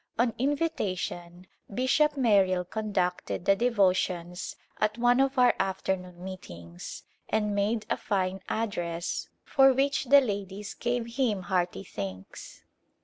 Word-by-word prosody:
On 235 0 +2
invitation 185 - -2 0.3
Bishop 280 +6 +2
Merrill 195 -7 +3
conducted 185 -4 -2
the 195 - +5
devotions 185 -6 0 0.2
at 215 +1 +1
one 245 +1 +4
of 270 0 +2
our 250 -1 +6
afternoon 185 -2 -2
meetings 85 - -8 0.3
and 210 -1 +1
made 210 +2 0
a - - 0
fine 190 -2 -1
address 175 -6 -2 0.2
for 270 -1 +6
which 275 +2 +1
the 280 +3 +8
ladies 200 -4 -4
gave 240 0 -1
him 220 -8 +1
hearty 180 0 -1
thanks. 95 - -8
200 Hz, 120 wpm, -28 LUFS, 180-240 Hz, 0.3 s, the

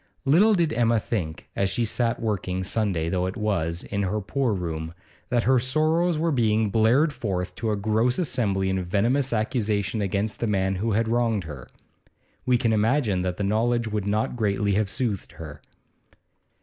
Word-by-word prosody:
Little 195 +11 +5
did 165 -4 +1
Emma 115 -1 +2
think, 85 -8 -4
as 100 0 +1
she 115 +5 0
sat 115 +1 0
working, 95 -4 -2
Sunday 95 -5 -1
though 90 +1 0
it 95 - -5
was, 90 -5 -1
in 100 0 -3
her 100 +2 -1
poor 125 +5 -1
room, 85 -4 -4 0.3
that 120 -3 +1
her 130 +1 +4
sorrows 155 +6 +1
were 165 +1 +1
being 110 -5 +1
blared 125 +9 +3
forth 95 -8 -3
to 115 - -2
a 105 - +1
gross 110 +4 +1
assembly 105 - 0
in 95 -1 -1
venomous 115 +9 +1
accusation 110 -3 -1
against 100 +2 -1
the 115 - -1
man 95 -2 0
who 110 +3 -1
had 115 +2 +1
wronged 115 -3 +1
her. 70 -6 -9 0.8
We 125 -1 +4
can 115 -2 +1
imagine 110 -3 +1
that 90 -1 -2
the 105 - -2
knowledge 115 +3 +1
would 105 -2 -2
not 105 +4 0
greatly 100 -3 0
have 105 0 +1
soothed 105 -4 -3
her. 75 -3 -10
110 Hz, 175 wpm, -25 LUFS, 95-120 Hz, 0.8 s, Little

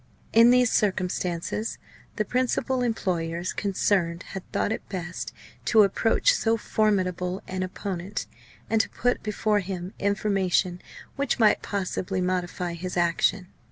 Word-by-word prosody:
In 230 +1 +8
these 250 -1 +5
circumstances, 185 +1 -1 0.4
the 215 - 0
principal 255 +2 0
employers 175 -7 -1
concerned 185 -3 0
had 190 - -8
thought - - 0
it - - -4
best 180 -2 -5 0.3
to 220 -2 +6
approach 225 - +3
so 230 - +1
formidable 185 -4 0
an 185 0 -3
opponent 185 +1 -4 0.4
and 225 -1 +3
to - - -5
put 245 +1 0
before 210 0 +1
him 185 -1 -5
information 195 -3 +1 0.4
which 280 +1 0
might 220 -4 +4
possibly 190 -1 -2
modify 180 -1 -1
his 180 +2 -5
action. 175 +2 +1
195 Hz, 125 wpm, -26 LUFS, 180-215 Hz, 0.4 s, In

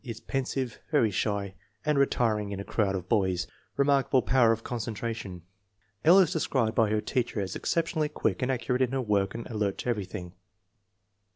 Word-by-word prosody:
Is 115 -4 -6
pensive, 130 -2 -3
very 130 -9 +3
shy, 100 0 -1 0.3
and 150 0 +2
retiring 110 -7 +1
in 100 - -4
a - - -4
crowd 100 -2 0
of 90 -1 -4
boys. 95 -3 +1 0.3
Remarkable 140 -2 +3
power 125 -3 +4
of 115 0 -1
concentration. 110 -5 -4 0.6
L. 175 +7 +7
is 185 -3 +5
described 130 -8 0
by 110 -2 +3
her 105 0 +1
teacher 120 0 -1
as 95 -2 -3
exceptionally 160 -2 0
quick 110 -10 -1
and 130 +1 +1
accurate 125 0 -1
in 130 0 +1
her 135 - 0
work 100 -2 +1
and 115 - -5
alert 105 -4 -2
to - - -4
everything. 95 -5 -4
115 Hz, 175 wpm, -28 LUFS, 100-130 Hz, 0.6 s, L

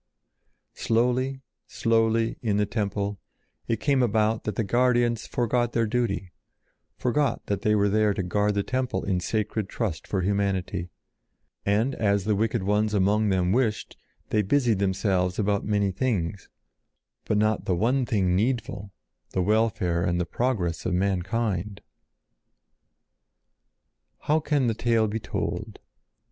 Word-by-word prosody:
Slowly, 125 +3 0 0.3
slowly, 115 0 +1
in 105 -4 0
the 105 - +2
Temple, 100 -1 -2 0.5
it 115 -2 0
came 140 -1 +2
about 110 -1 +1
that 105 - -2
the 115 - 0
guardians 120 +1 +2
forgot 120 0 0
their 115 -1 +2
duty, 105 -6 -1 0.7
forgot 125 +1 0
that 100 - -2
they 105 0 +2
were 100 -1 +3
there 105 +1 +3
to 95 - -1
guard 105 +3 0
the 100 - +1
temple 130 +2 -2
in 95 -2 0
sacred 105 +1 -2
trust 105 -9 -3
for 95 - -1
humanity; 95 -2 -1 0.8
and 110 +7 +2
as 100 -2 +1
the 105 +2 +1
wicked 110 0 0
ones 105 +2 +1
among 105 +2 +2
them 90 -2 +1
wished, 115 -1 0 0.4
they 105 - +3
busied 115 0 +2
themselves 95 -2 0
about 100 -1 0
many 100 -2 +1
things; 95 -4 -2 0.8
but 105 - +1
not 110 +1 +1
the 90 - +1
one 125 +8 +1
thing 95 -6 +1
needful, 110 -2 -1 0.4
the 95 - +1
welfare 105 -4 +1
and 85 0 0
the 90 - 0
progress 100 -10 -1
of 90 - 0
mankind. 100 +1 -1 2.4
How 155 +2 +2
can 145 -3 +1
the 115 - +1
tale 115 -1 +1
be 110 +2 -3
told? - - -4
105 Hz, 140 wpm, -26 LUFS, 100-115 Hz, 2.4 s, were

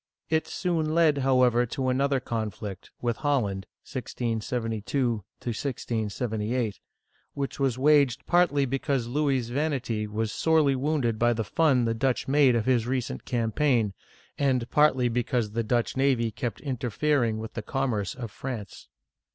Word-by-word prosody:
It 160 0 +1
soon 165 -4 -1
led, 160 -4 +4
however, 125 -2 +3
to 130 +2 -2
an 130 +1 +1
other 140 -1 +2
conflict, 110 -5 -5
with 120 -2 0
Holland 105 -10 0 0.2
(1672 120 0 -2 0.3
1678), 115 -2 -2 0.6
which 140 0 -3
was 135 -3 +1
waged 140 -1 +3
partly 170 -6 +3
because 135 -1 -1
Louis's 130 -2 0
vanity 130 -6 -1
was 110 +1 -2
sorely 155 -4 +3
wounded 130 -5 0
by 120 0 +4
the 115 -1 -2
fun 130 0 +2
the 115 - +1
Dutch 125 +2 0
made 135 -2 +4
of 115 -2 0
his 120 -3 +2
recent 125 - -2
campaign, 115 -2 +1 0.5
and 130 -4 +1
partly 140 -4 +4
because 120 -2 0
the 115 +2 -1
Dutch 120 +1 0
navy 130 -4 +2
kept 120 -2 -4
interfering 125 -2 0
with 110 0 -6
the 115 - -4
com 135 +3 -1
merce 100 -3 -2
of 120 -4 -6
France. 115 -8 -7
125 Hz, 145 wpm, -27 LUFS, 115-140 Hz, 0.6 s, led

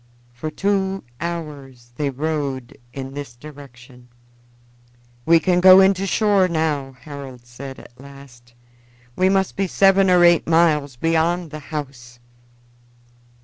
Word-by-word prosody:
For 140 +6 -6
two 195 +3 -1 0.2
hours 145 -8 -7
they 145 0 -2
rowed 140 -3 -4 0.2
in 135 +1 -8
this 140 -4 -8
direction. 125 -3 -14 1.2
"We 165 0 +6
can 180 +1 +1
go 185 +1 +8
in 195 +1 +5
to 195 +1 -4
shore 200 -2 +2
now," 155 -5 -2
Harold 135 -4 -10
said 130 +3 -10
at 120 - -16
last. 135 -4 -16 0.6
"We 185 +1 +2
must 190 -1 0
be 195 -1 -1
seven 195 +1 +3
or 180 -1 +5
eight 170 -1 +4
miles 155 -5 +2
beyond 165 +4 0
the 155 - -7
house." 135 -5 -8
150 Hz, 130 wpm, -20 LUFS, 135-175 Hz, 1.2 s, go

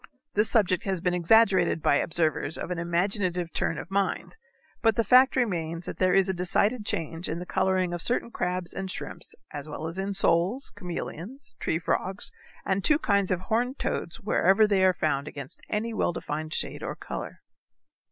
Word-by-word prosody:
This 210 +2 +2
subject 185 -6 +2
has 190 -2 -1
been 180 +1 0
exaggerated 185 -1 +4
by 145 - +3
observers 160 -1 0
of - - -5
an 175 - -2
imaginative 175 0 -1
turn - - 0
of - - -7
mind, 200 0 -1 0.5
but 225 -2 +4
the 230 - +2
fact 255 +3 +6
remains 170 -9 -1
that - - -6
there 185 -1 +3
is 195 -1 +4
a 190 - 0
decided 205 +5 0
change 165 +2 -3
in 160 - -2
the 175 - -5
coloring 185 -1 +1
of 175 - -3
certain 235 +2 -1
crabs 180 -3 -2
and 190 -1 -4
shrimps - - -7 0.2
as 145 +1 -6
well 150 - -5
as 165 +3 -5
in 195 +1 -2
soles, 190 +7 +1
chameleons, 180 - -7
tree 160 - 0
frogs, 185 +3 -2 0.3
and 190 0 0
two 300 - +4
kinds 200 - +1
of 185 -1 0
horned 245 +7 0
toads 170 +6 -3
wherever 210 -1 +4
they 200 -3 +2
are 185 -1 +4
found 140 -1 0
against 140 -3 -8
any 225 +2 -1
well 195 - 0
defined 155 0 -4
shade - - -1
or - - -4
color. - - -7
185 Hz, 185 wpm, -27 LUFS, 170-205 Hz, 0.5 s, fact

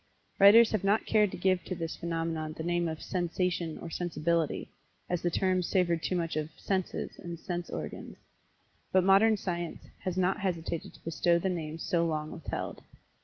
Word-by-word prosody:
Writers 220 +3 +8
have 215 -3 0
not 205 +3 +2
cared 210 -2 +4
to - - -7
give 185 0 +2
to 185 - -4
this 165 -1 -4
phenomenon 165 -2 -3
the 160 - -6
name 175 0 +1
of 160 -1 -5
"sensation," 175 -2 -1
or 170 - -8
"sensibility," 170 -2 -1 0.4
as 175 -1 -1
the 175 - +1
terms 185 0 +1
savored 170 -4 +2
too 185 - -1
much 165 -3 -1
of 155 0 -2
"senses," 190 -2 -2
and 170 -1 -7
"sense 175 0 -4
organs." - - -6 0.7
But 185 -1 +4
Modern 200 +3 +5
Science 175 -3 -4 0.2
has 185 -1 -3
not 185 +2 +2
hesitated 170 -4 -3
to - - -19
bestow 165 +2 +2
the 190 +3 0
names 160 -2 -4
so 170 -4 +1
long 155 -2 -1
withheld. 160 - -5
175 Hz, 175 wpm, -30 LUFS, 165-185 Hz, 0.7 s, Writers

